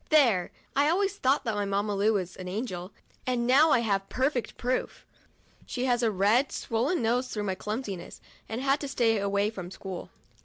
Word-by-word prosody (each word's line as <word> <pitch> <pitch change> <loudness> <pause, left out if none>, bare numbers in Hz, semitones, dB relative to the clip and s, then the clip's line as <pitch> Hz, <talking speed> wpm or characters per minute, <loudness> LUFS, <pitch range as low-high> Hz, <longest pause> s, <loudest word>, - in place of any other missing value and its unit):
' - - -33
There 240 - +4
— - - -35
I 285 +2 +4
always 395 +3 +1
thought 270 -1 +2
that 225 -5 -1
my 205 0 -1
Mamma 200 +1 0
Lu 210 +3 +3
was 185 -3 -2
an 185 - -7
angel, 185 -2 -4 0.4
and 245 -2 +1
now 275 +6 +6
I 255 - +4
have 195 -3 0
perfect 260 -1 -1
proof. 250 +1 -2 0.6
She 250 0 -2
has 245 -2 +2
a 230 - +3
red, 215 +7 +3
swollen 245 +6 -1
nose 245 +3 +1
through 210 -3 -3
my 195 -2 -1
clumsiness, 210 -2 -5 0.3
and 225 +3 -3
has 270 - -4
had 280 - +3
to 285 - -4
stay 230 -5 +2
away 200 +1 +1
from 185 -5 -7
school. 190 -1 -7
225 Hz, 205 wpm, -28 LUFS, 200-260 Hz, 0.6 s, now